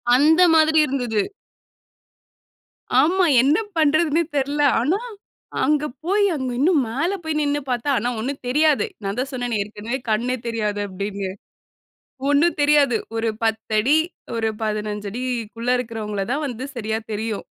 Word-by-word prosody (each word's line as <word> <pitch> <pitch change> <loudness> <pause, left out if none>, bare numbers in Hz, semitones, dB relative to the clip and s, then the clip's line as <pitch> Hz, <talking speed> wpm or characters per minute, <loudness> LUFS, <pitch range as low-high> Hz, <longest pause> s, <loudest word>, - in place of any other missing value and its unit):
அந்த 315 +6 +5
மாதிரி 315 0 +5
இருந்துது. 245 -6 -1 1.8
ஆமா. 365 +5 +3 0.2
என்ன 285 +5 +3 0.2
பண்றதுன்னே 310 +1 +3
தெரில. 285 +2 0 0.2
ஆனா, 305 - +1 0.6
அங்க 300 +2 +2 0.2
போயி 400 +4 +2
அங்க 260 -3 -3
இன்னும் 300 +3 +3
மேல 315 - -1
போயி 315 0 -2
நின்னு 290 0 0
பார்த்தா 245 +2 -1
ஆனா, 240 - 0
ஒண்ணும் 270 +5 -4
தெரியாது. 300 - +3 0.2
நான் 195 +2 -3
தான் 265 +2 -2
சொன்னேனே 245 -3 -2
ஏற்கனவே 215 +4 -5
கண்ணே 240 +4 +1
தெரியாது 210 -3 -1
அப்டின்னு. 200 0 -4 1.0
ஒண்ணும் 295 +4 +3
தெரியாது 290 -4 +4 0.2
ஒரு 225 0 0
10' 220 +4 +1 0.4
ஒரு 225 -1 0
15'குள்ள 220 +2 -3
இருக்கறவங்கள 220 -4 -3
தான் 290 +3 -1
வந்து 250 -1 -6
சரியா 220 -2 -2
தெரியும். 215 0 -3
250 Hz, 125 wpm, -22 LUFS, 220-295 Hz, 1.8 s, அந்த